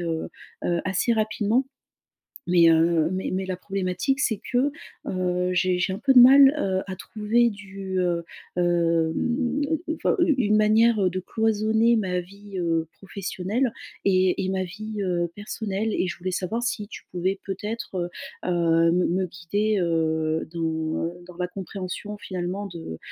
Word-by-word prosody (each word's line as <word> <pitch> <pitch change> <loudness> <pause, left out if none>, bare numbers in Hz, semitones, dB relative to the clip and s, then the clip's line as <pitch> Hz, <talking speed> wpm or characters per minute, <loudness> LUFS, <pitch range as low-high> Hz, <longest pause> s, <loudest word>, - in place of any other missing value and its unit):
heu, 165 -2 -2 0.4
heu 170 -1 +1
assez 190 +5 +1
rapidement 220 +3 +1 0.8
mais, 170 -2 +6
heu, 165 0 +3
mais 185 0 -2
mais 190 +1 -1
la 185 -1 -3
problématique, 195 +8 -1
c'est 220 -6 0
que, 260 +4 +3 0.4
heu, 180 -1 0
j'ai 180 0 +2
j'ai 190 +1 0
un 195 - -4
peu 270 +4 +3
de 250 - +10
mal, 270 +2 +8
heu, 190 -9 0
à 190 - -5
trouver 220 +5 +1
du, 195 -2 -6
heu, 175 -2 +1 0.3
hem 175 - +1 0.3
enfin, - - +1
une 335 -4 +4
une 210 -3 +3
manière, 215 +1 +4
heu, 185 - +3
de 185 - -3
cloisonner 220 +3 +2
ma 185 -4 0
vie, 200 +2 -11
heu, 165 -2 0
professionnelle 200 +5 -2 0.3
et 185 -1 +2
et 185 - -2
ma 190 0 0
vie, 210 +3 -5
heu, 175 -2 0
personnelle 210 0 -3
et 185 - 0
je 175 - -4
voulais 185 +2 -3
savoir 185 +6 -2
si 215 -3 -2
tu - - -10
pouvais 185 +2 -1
peut-être, 205 +2 -5
heu, 175 -1 -2 0.4
heu 165 -1 +3
me 180 +1 +2
me 185 +2 0
guider, 200 +5 -1
heu, 160 -2 0
dans 160 0 -2
dans 180 -1 -12
la 180 0 -1
compréhension 195 +2 -6
finalement 185 +1 -4
de, 165 - -8
190 Hz, 160 wpm, -25 LUFS, 175-215 Hz, 0.8 s, de